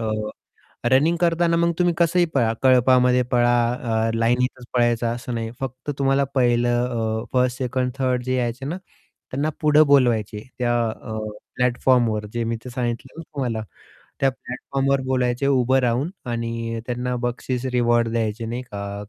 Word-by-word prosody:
अ, 110 - -2 0.9
running 150 +6 +4
करतांना 170 0 +2
मग 170 0 +2
तुम्ही 175 -1 +3
कसंही 175 +1 +3
पळा, 115 -5 +2
कळपामध्ये 125 0 +5
पळा, 120 0 +3 0.2
अ, 115 -2 -1
लाईनीतच 125 +2 0
पळायचं 120 -1 +2
असं 125 +1 -6
नाही 115 -1 -3
फक्त 130 +1 -6
तुम्हाला 135 0 +3
पहिलं 120 -1 +2
अ, 110 -2 -2
1st, 125 -1 +2
2nd, 125 0 -1
3rd 130 -2 0
जे 130 +1 -1
यायचे 120 +1 -2
ना, 165 +6 -3 0.5
त्यांना 140 +4 0
पुढे 150 0 +5
बोलवायचे. 110 -6 +2 0.2
त्या 120 -1 +1 0.2
अ, 110 0 -7 0.4
प्लॅटफॉर्मवर 120 -3 +2
जे 120 0 -1
मी 115 0 -1
ते 125 - -5
सांगितलं 120 +3 -4
ना - - -6
तुम्हाला 120 -6 -2 0.6
त्या 135 - +3
प्लॅटफॉर्मवर 135 +2 -2
बोलायचे 130 0 0
उभं 130 -1 +3
राहून 125 +5 0 0.2
आणि 115 -1 -3
त्यांना 125 0 -2
बक्षीस, 125 +1 -3
रिवॉर्ड 120 -1 +3
द्यायचे 115 0 -2
नाही 120 +2 -4
का 100 0 -5
125 Hz, 150 wpm, -22 LUFS, 115-130 Hz, 0.9 s, कळपामध्ये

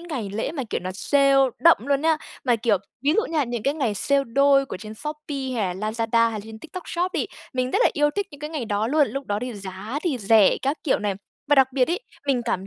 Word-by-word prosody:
ngày 275 - -5
lễ 220 +7 -2
mà, 285 -5 -3
kiểu, - - -1
nó 185 +1 -4
sale 275 +5 +3 0.3
đậm 335 0 +7
luôn 280 -1 +2
nhá. 320 0 +3 0.3
Mà, 240 -3 +3
kiểu, 225 -2 +2 0.3
ví 290 +2 +3
dụ 445 - +4
nha, 300 -4 +2
những 240 -2 -4
cái 280 +2 +1
ngày 245 -9 -1
sale 280 +6 +1
đôi 275 +2 +3
của - - -6
trên 215 +3 -9
Shopee 295 -1 -5
hay 195 -6 -1
là 215 +3 -3
Lazada 230 0 +2
hay - - -7
là 215 - -4
trên 220 0 -10
TikTok 355 +5 -9
Shop 355 +2 -1
đi, - - -1 0.3
mình 255 0 -1
rất 405 - +1
là - - +6
yêu 295 0 +2
thích 405 +4 -2
những 285 -2 -13
cái 300 - -5
ngày 305 -6 -3
đó 210 0 -1
luôn, 290 +1 +3
lúc 275 +4 -5
đó 205 0 -1
thì 250 -2 -4
giá 200 +6 -6
thì 310 -8 -1
rẻ 210 -1 +5
các 275 +4 0
kiểu 280 - +2
này. 205 -2 -1 0.3
Và 290 - +6
đặc 265 -2 +4
biệt 255 -2 +2
ấy, 360 - -1 0.3
mình 260 -3 +2
cảm 190 -5 -2
265 Hz, 265 wpm, -24 LUFS, 220-295 Hz, 0.3 s, đậm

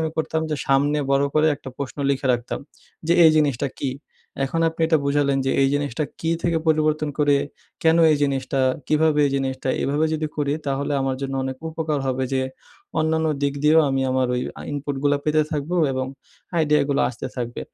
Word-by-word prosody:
আমি 160 -1 -1
করতাম 160 0 -1
যে 150 - 0
সামনে 145 +2 +2
বড় 140 +1 +3
করে 155 +1 +4
একটা 135 - -10
প্রশ্ন 140 +1 -5
লিখে 135 0 -1
রাখতাম। 120 0 -3 0.5
যে 170 - +3
এই 160 - +8
জিনিসটা 140 -3 +1
কী? 135 - -1 0.5
এখন 165 +5 -2
আপনি 165 0 -8
এটা 160 -1 +3
বুঝালেন 140 -1 +2
যে, - - +2
এই 135 - +4
জিনিসটা 145 0 -1 0.2
কী 165 - -1
থেকে 170 -2 +1
পরিবর্তন 155 -1 +2
করে 145 -1 +4 0.5
'কেন 160 0 +4 0.2
এই - - +2
জিনিসটা', 135 -1 0 0.2
'কিভাবে 155 0 +2
এই 140 - -1
জিনিসটা' 130 -1 -2
এভাবে 145 +3 +1
যদি 155 0 -1
করি 145 -1 0
তাহলে 140 +1 -1
আমার 135 -1 -1
জন্য 135 0 -3
অনেক 130 0 -4
উপকার 155 -2 -2
হবে 130 0 0
যে 130 0 +1 0.6
অন্যান্য 160 0 +1 0.2
দিক 140 0 +1
দিয়েও 155 +2 +6
আমি 135 - 0
আমার 130 0 +1
ওই 125 - 0 0.2
আ - - -9
ইনপুট 145 -1 -3
গুলো 145 0 +3
পেতে 155 0 +3
থাকবো 155 +3 -2 0.2
এবং 130 0 -2 0.5
আইডিয়া 150 -2 +3
গুলো 140 - +1
আসতে 120 - -6
থাকবে। 120 -1 -4
145 Hz, 195 wpm, -22 LUFS, 135-155 Hz, 0.6 s, এই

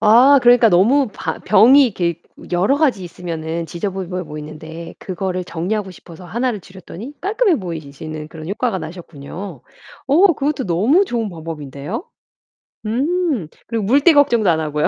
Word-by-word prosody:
아 240 +6 +7
그러니까 240 -1 +6
너무 225 +9 +4
바 - - -4
병이 260 +7 +6
이렇게 175 -6 -2 0.3
여러 190 +10 +2
가지 270 - +1
있으면은 165 -1 -5
지저분해 180 +1 -4
보이는데 155 +2 -9
그거를 185 -1 -4
정리하고 190 +4 -3
싶어서 170 0 -13
하나를 230 +4 -2
줄였더니 190 - -10
깔끔해 410 -2 +2
보이시는 155 -3 -7
그런 160 0 -9
효과가 205 0 -1
나셨군요. 165 0 -9 0.4
어 310 +9 +5
그것도 285 -1 -1
너무 220 - +3
좋은 235 - -2
방법인데요. 160 - -6 0.8
음 280 - 0 0.2
그리고 230 -2 -2
물때 280 - +5
걱정도 240 -8 +4
안 160 -2 +2
하고요. 150 -1 0
190 Hz, 355 characters per minute, -19 LUFS, 165-245 Hz, 0.8 s, 아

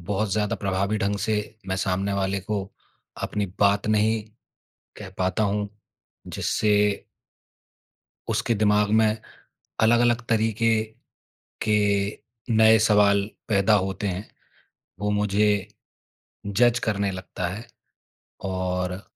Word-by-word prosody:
बहुत 100 +3 -2
ज़्यादा 105 0 0
प्रभावी 100 +2 -1
ढंग 100 +1 0
से 110 - 0 0.3
मैं 95 - -1
सामने 95 +1 -1
वाले 95 0 -1
को 100 +1 -2 0.6
अपनी 105 -1 -2
बात 100 0 +3
नहीं 110 +1 +2 0.8
कह 100 -3 -8
पाता 95 +3 0
हूँ, 105 0 0 0.6
जिससे 105 -1 +1 1.2
उसके 115 +1 0
दिमाग 105 -1 +2
में 110 -1 +2 0.6
अलग-अलग 120 +1 +3
तरीके 115 0 +2 0.9
के 105 -1 +2 0.8
नए 110 0 +6
सवाल 100 -1 +4 0.2
पैदा 100 0 +3
होते 95 +1 -1
हैं। 95 +3 -4 0.7
वो 105 0 -1
मुझे 105 0 +1 0.8
जज़ 120 +4 +3
करने 100 -2 0
लगता 90 0 -5
है 110 +6 -7 0.9
और 90 0 -2
105 Hz, 105 wpm, -24 LUFS, 100-110 Hz, 1.2 s, नए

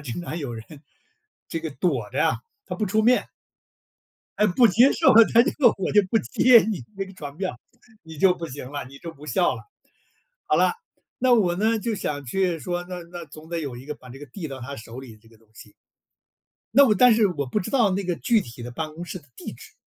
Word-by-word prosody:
经 135 +5 -5
常 170 0 -5
有 135 -6 -5
人 110 -1 -8 0.8
这 165 - -3
个 160 -1 -5
躲 130 - -1
着 135 - 0
啊， 160 - +1 0.3
他 - - -4
不 215 - -1
出 215 +3 +1
面。 250 +3 +2 1.1
哎， 210 - +4
不 235 +7 +4
接 240 +8 +5
受， 325 - +4 0.2
他 235 - +7
就 - - 0 0.3
我 190 - -2
就 205 - +6
不 225 - +3
接 245 +1 +5
你 215 -6 -3
那 195 0 -3
个 190 - -12
传 145 -5 -8
票。 185 -9 -4 0.4
你 160 -2 -11
就 185 +2 +5
不 170 -2 -6
行 130 -1 -8
了， 145 -3 -5
你 140 +1 -13
就 165 +1 -9
不 150 0 -14
笑 180 +4 +1
了。 - - -9 0.8
好 - - +2
了， - - +3 0.5
那 255 0 +3
我 185 -6 +2
呢， 220 +3 +1
就 230 0 -2
想 145 -7 -4
去 175 +5 0
说， 175 +5 -3
那 180 -1 -7
那 175 -1 -7
总 155 +2 -13
得 170 - -2
有 135 -5 -5
一 125 - -11
个 150 +1 -5
把 125 - -16
这 130 - -11
个 145 - -9
递 160 +4 -7
到 135 -1 -8
他 140 +3 -7
手 115 0 -10
里 130 -3 -10
的 110 - -17
这 115 - -22
个 115 - -21
东 110 - -28
西。 - - -15 1.0
那 280 +5 +7
我 215 - +3
但 245 +3 +6
是 215 -2 +4
我 150 -6 -3
不 130 +11 -1
知 180 - -5
道 235 -8 +3
那 195 +1 -1
个 175 -1 -1
具 225 +4 +2
体 120 0 -10
的 120 - -7
办 155 +4 -5
公 170 +3 -8
室 185 - -7
的 145 - -24
地 - - -8
址。 - - -14
170 Hz, 260 characters per minute, -24 LUFS, 140-205 Hz, 1.1 s, 他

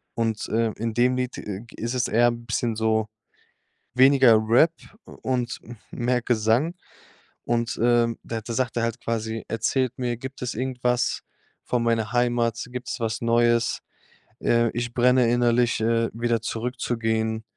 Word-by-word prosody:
Und, 115 -2 -2
ähm, 115 0 +1
in 115 +1 -2
dem 125 +3 +2
Lied 125 0 -2
g 105 +2 -6
ist 115 +2 -3
es 125 - +1
eher 120 +2 +4
bisschen 115 0 -2
so, 110 0 +1 0.9
weniger 130 -2 +6
Rap 140 +9 +5 0.3
und 125 -2 -3
m 120 - -11 0.2
mehr 125 0 0
Gesang. 120 +8 +1 0.7
Und, 120 0 -1
ähm, 120 -1 +3
da 115 - -4
sagt 120 0 -2
er 115 - +1
halt 115 +1 -2
quasi: 115 -1 -3
„Erzählt 125 +3 0
mir, 125 -2 -1
gibt 130 +3 -9
es 125 - -3
irgendwas 125 0 -1 0.4
von 120 -1 0
meiner 115 -1 0
Heimat? 120 -2 +1
Gibt's 125 0 -5
was 115 -1 -1
Neues? 120 0 +2 0.6
Ähm. 115 0 +2
Ich 120 0 -3
brenne 125 -1 +4
innerlich, 120 -1 +2
äh, 115 +1 +1
wieder 115 0 0
zurückzugehen.“ 115 -1 -2
120 Hz, 145 wpm, -24 LUFS, 115-125 Hz, 0.9 s, weniger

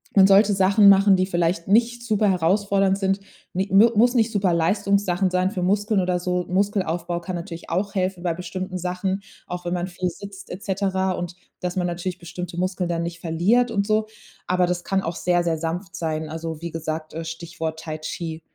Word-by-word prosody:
man 195 -1 +8
sollte 200 +1 +5
Sachen 195 +2 +5
machen, 195 0 +6
die 185 - +2
vielleicht 170 -1 0
nicht 235 +4 +3
super 215 -3 +2
herausfordernd 195 +2 +2
sind. 195 0 0 0.3
Ni 190 +2 -1
mu 215 +4 +7
muss 240 +2 +5
nicht 225 -1 +3
Superleistungssachen 195 0 +1
sein 185 +1 +1
für 185 - -3
Muskeln 205 +2 +2
oder 180 -1 0
so. 180 0 -1
Muskelaufbau 180 -3 0
kann 185 +1 -5
natürlich 170 0 -7
auch 200 +4 -1
helfen 185 -1 -1
bei 170 -2 0
bestimmten 185 +2 -5
Sachen, 185 +2 -2 0.3
auch 180 0 -6
wenn 175 - -1
man 175 +1 -1
viel 180 0 -3
sitzt 200 +2 -10
et 185 +3 -7
cetera 190 -1 0
und 175 0 -5 0.3
dass 180 0 -3
man 180 -2 0
natürlich 175 +1 -3
bestimmte 175 0 -7
Muskeln 185 0 -1
dann 170 -1 -1
nicht 170 0 -5
verliert 200 +10 +2
und 200 -2 0
so. 215 0 +1 0.4
Aber 180 -1 +2
das 175 0 -2
kann 195 0 +1
auch 165 +2 -3
sehr, 175 -1 +1
sehr 165 -2 0
sanft 165 +3 -4
sein. 155 -1 -3
Also, 160 0 -5
wie 170 -1 -5
gesagt, 155 -1 -4
äh, 165 +1 -5
Stichwort 165 -1 -5
Tai 155 -1 -5
Chi. 160 +1 -5
180 Hz, 195 wpm, -23 LUFS, 170-195 Hz, 0.4 s, man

